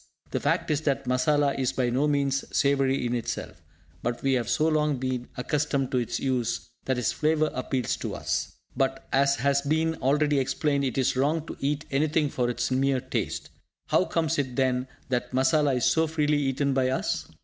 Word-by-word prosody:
The - - 0
fact - - 0
is 150 -1 +1
that 140 -3 0
masala 140 +3 +2
is 130 -2 0
by 125 -2 0
no 135 +5 +2
means 140 -2 +1
savoury 135 -2 +2
in 120 - -1
itself, 120 -2 -4 0.4
but 120 +1 -3
we 135 -1 +2
have 120 -3 0
so 155 - +2
long 150 -2 +1
been 125 -1 -3
accustomed 140 0 -1
to 130 - +2
its 120 - -2
use 125 -3 -1
that 130 -1 0
its 115 -8 +1
flavour 155 - +1
appeals 130 -1 -1
to - - -4
us. - - -2 0.2
But, 135 0 -1
as 140 +1 +4
has 140 +3 +2
been 160 +3 +1
already 145 +1 +2
explained, 140 +1 0
it 130 - -2
is 130 -1 +2
wrong 150 +4 +1
to - - -7
eat 145 +1 -1
anything 150 +2 +1
for 120 -1 0
its 120 - -2
mere 135 0 +2
taste. 130 +1 -3 0.4
How - - +3
comes 160 -2 0
it, 130 -3 -2
then, 130 -1 +1 0.2
that 125 -1 -1
masala 135 +2 +3
is 125 - +1
so 160 0 +3
freely 150 -2 +1
eaten 140 0 0
by 130 -1 +2
us? 130 - -1
135 Hz, 195 wpm, -27 LUFS, 130-150 Hz, 0.4 s, as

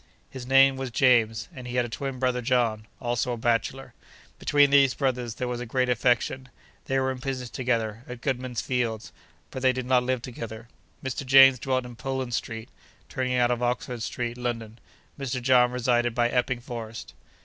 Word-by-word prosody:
His 130 -2 -8
name 135 0 +5
was 135 -1 -4
James, 115 -3 +3
and 125 -4 -9
he 125 - -5
had 125 -1 +2
a - - -4
twin 135 +3 -5
brother 125 -1 0
John, 115 -3 0
also 120 0 -1
a - - -4
bachelor. 120 +3 -1 0.5
Between 145 -1 +4
these 140 -2 +5
brothers 125 -4 -1
there 125 - -3
was 125 -1 -3
a - - -4
great 125 +2 0
affection. 125 +2 +1 0.4
They 135 0 0
were 130 0 0
in 130 - -6
business 125 -2 -4
together, 115 -3 -1
at 125 -1 -8
Goodman's 130 -3 -2
Fields, 115 -4 -2 0.4
but 130 - -6
they 130 0 +4
did 130 -1 -4
not 125 0 +3
live 125 -1 -2
together. 115 -2 -7 0.4
Mr. 130 +1 -3
James 135 -1 +7
dwelt 130 0 -1
in 120 -1 -9
Poland 130 0 -4
Street, 115 0 -4 0.4
turning 130 -1 -1
out 120 -1 +3
of 120 0 -1
Oxford 125 0 -2
Street, 120 +1 -4
London; 115 -2 -4 0.4
Mr. 130 -2 -2
John 125 -1 +4
resided 120 -1 +1
by 120 -1 +2
Epping 125 0 0
Forest. 115 -3 -7
125 Hz, 185 wpm, -26 LUFS, 120-130 Hz, 0.5 s, James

